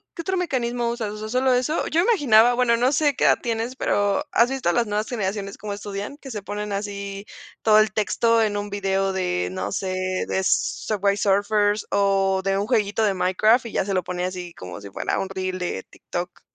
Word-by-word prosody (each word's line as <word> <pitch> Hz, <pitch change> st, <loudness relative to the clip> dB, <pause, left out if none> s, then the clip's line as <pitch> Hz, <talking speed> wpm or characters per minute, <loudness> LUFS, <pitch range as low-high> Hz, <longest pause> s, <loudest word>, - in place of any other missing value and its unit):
qué 335 Hz, -, -5 dB
otro 375 Hz, +2 st, -1 dB
mecanismo 245 Hz, -8 st, -1 dB
usas? 230 Hz, -3 st, -3 dB
O -, -, -7 dB
sea, 215 Hz, 0 st, -6 dB
¿solo 255 Hz, +2 st, +2 dB
eso? 255 Hz, +6 st, 0 dB
Yo 320 Hz, -, +1 dB
me 410 Hz, -, +1 dB
imaginaba, 245 Hz, -, +5 dB
bueno, 240 Hz, -1 st, +3 dB
no 250 Hz, +3 st, +2 dB
sé 295 Hz, -1 st, +2 dB
qué -, -, +1 dB
edad -, -, +5 dB
tienes, 230 Hz, +1 st, -3 dB
pero 205 Hz, -5 st, +1 dB
¿has 235 Hz, +1 st, +4 dB
visto 265 Hz, -10 st, 0 dB
las 235 Hz, +3 st, +1 dB
nuevas 210 Hz, +1 st, -1 dB
generaciones 200 Hz, -3 st, -3 dB
como 210 Hz, -1 st, -5 dB
estudian 205 Hz, +5 st, -6 dB
que 270 Hz, -3 st, -10 dB
se 210 Hz, -, -5 dB
ponen 205 Hz, +1 st, -5 dB
así 200 Hz, 0 st, -5 dB, 0.4 s
todo 215 Hz, -1 st, +5 dB
el 215 Hz, -1 st, +2 dB
texto 230 Hz, +2 st, +2 dB
en 210 Hz, -2 st, +1 dB
un 205 Hz, 0 st, -4 dB
video 195 Hz, -1 st, 0 dB
de 90 Hz, -, -1 dB
no 95 Hz, +2 st, -4 dB
sé 185 Hz, -, -2 dB, 0.3 s
de 190 Hz, -, 0 dB
Subway 200 Hz, +1 st, +1 dB
Surfers 205 Hz, +1 st, +1 dB
o 195 Hz, -1 st, +2 dB
de 195 Hz, 0 st, +1 dB
un 200 Hz, -, 0 dB
jueguito 220 Hz, -2 st, +1 dB
de 205 Hz, -2 st, +2 dB
Minecraft 215 Hz, +6 st, +2 dB
y -, -, -10 dB
ya -, -, 0 dB
se 195 Hz, -, -2 dB
lo 185 Hz, -, +1 dB
pone 180 Hz, +1 st, -4 dB
así 180 Hz, -2 st, -6 dB
como 90 Hz, +2 st, -8 dB
si 100 Hz, -, -9 dB
fuera 95 Hz, -, -2 dB
un 195 Hz, -, -3 dB
reel 185 Hz, -1 st, -3 dB
de 175 Hz, -, -3 dB
TikTok? -, -, -6 dB
205 Hz, 220 wpm, -23 LUFS, 195-235 Hz, 0.4 s, imaginaba